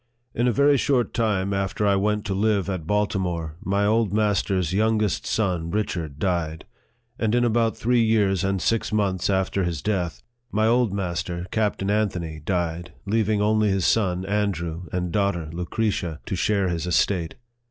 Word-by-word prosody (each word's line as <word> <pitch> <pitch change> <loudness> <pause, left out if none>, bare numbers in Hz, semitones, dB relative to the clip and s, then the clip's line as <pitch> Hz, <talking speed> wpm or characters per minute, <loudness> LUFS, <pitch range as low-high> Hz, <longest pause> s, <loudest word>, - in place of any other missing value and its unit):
IN 120 +2 +1
a - - +4
very 140 +3 +4
short 125 -2 +1
time 100 -4 0
after 100 +1 -1
I 100 -1 +4
went 105 +2 0
to 100 - -1
live 100 -1 +1
at 85 -4 -5
Baltimore, 90 -6 -1
my 100 +1 +1
old 110 -1 +2
master's 100 -4 +1
youngest 110 -1 +1
son 90 -6 0
Richard 85 -7 -2
died; 80 -2 -2 0.5
and 110 0 +1
in 120 0 +3
about 115 -1 +1
three 120 +1 +2
years 100 -4 +2
and 95 0 0
six 115 +4 0
months 100 -4 0
after 95 0 +1
his 85 -4 -2
death, 90 -3 -2 0.3
my 110 +1 +2
old 120 -1 +3
master, 90 -2 -3
Captain 105 -2 0
Anthony, 90 -7 -1
died, 85 -1 -2
leaving 105 0 +1
only 110 0 +3
his 95 -3 +1
son, 95 -3 +1
Andrew, 90 -4 -2
and 90 -1 -2
daughter, 100 -5 0
Lucretia, 90 -2 -2
to - - -3
share 100 0 +1
his 85 0 -2
estate. 85 0 +1
100 Hz, 165 wpm, -24 LUFS, 90-110 Hz, 0.5 s, a